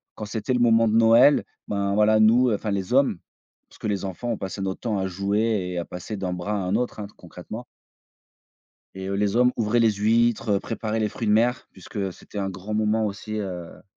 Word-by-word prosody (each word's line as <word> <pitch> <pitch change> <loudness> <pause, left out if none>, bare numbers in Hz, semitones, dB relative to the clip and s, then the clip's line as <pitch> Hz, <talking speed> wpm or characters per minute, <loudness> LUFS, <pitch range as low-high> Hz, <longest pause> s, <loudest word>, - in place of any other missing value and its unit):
quand 105 - -6
c'était 110 +4 -2
le 125 - +1
moment 115 -1 +4
de 110 - +1
Noël, 115 +5 +6 0.2
ben 100 -1 -1
voilà, 110 +1 +4
nous, 115 +3 +5
enfin 105 0 -2
les 100 +4 -2
hommes 135 -9 +3 0.5
parce - - -19
que - - -4
les 100 -2 -2
enfants, 95 +6 -5
on 110 - -2
passait 95 +1 -5
notre 95 -1 -3
temps 110 -4 -2
à 95 0 -1
jouer 100 +3 -1 0.3
et - - -4
à 85 - -1
passer 90 +4 -7
d'un 95 -2 -3
bras 90 +4 -3
à - - 0
un 95 -1 -1
autre 120 -1 -2
hein, 100 - -5
concrètement 90 +7 -9 1.3
et 95 0 -6
heu, 100 - -2
les 100 +1 0
hommes 125 +1 +4
ouvraient 115 +1 +1
les 115 -1 +5
huîtres, 115 +2 +1
heu, - - -1
préparaient 110 -1 -3
les 105 - +1
fruits 115 +2 -5
de - - +4
mer 120 +3 +2
puisque 95 0 -5
c'était 105 - -10
un 95 -1 -2
grand 95 +3 -6
moment 110 0 +1
aussi, 105 +2 -5
heu 90 -4 -6
105 Hz, 225 wpm, -24 LUFS, 95-115 Hz, 1.3 s, Noël